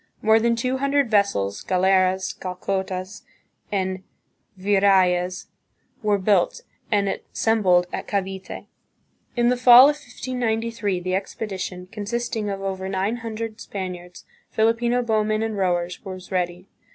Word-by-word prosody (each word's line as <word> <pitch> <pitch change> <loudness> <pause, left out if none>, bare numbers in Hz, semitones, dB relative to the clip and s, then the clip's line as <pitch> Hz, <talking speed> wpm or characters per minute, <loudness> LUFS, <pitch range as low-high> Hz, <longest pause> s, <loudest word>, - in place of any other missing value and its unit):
More 220 +1 +5
than 235 +1 +2
two 255 +2 -1
hundred 275 -2 +1
vessels, 150 - +1
"galeras," 185 0 +2
"galeotas," 190 +1 -4 0.5
and 190 -2 -1 0.6
"virrayes," 185 -2 +2 0.6
were 210 -2 +2
built, 195 -2 +1 0.3
and 200 -2 +2
assembled 195 -3 +1
at - - -4
Cavite. 195 -1 -4 0.7
In 240 -1 +3
the 250 - +3
fall 250 +2 +9
of 295 - -8
1593, 230 -6 -2
the 185 +1 -2
expedition, 190 -2 -4
consisting 220 0 -3
of 195 -1 -4
over 190 -1 -3
nine 195 +4 -1
hundred 225 -1 -6
Spaniards, 180 -2 -7 0.2
Filipino 235 +2 +1
bowmen 215 -1 +1
and 225 -1 -2
rowers, 180 -2 -1
was 185 -2 -9
ready. 180 0 -2
200 Hz, 120 wpm, -23 LUFS, 185-225 Hz, 0.7 s, fall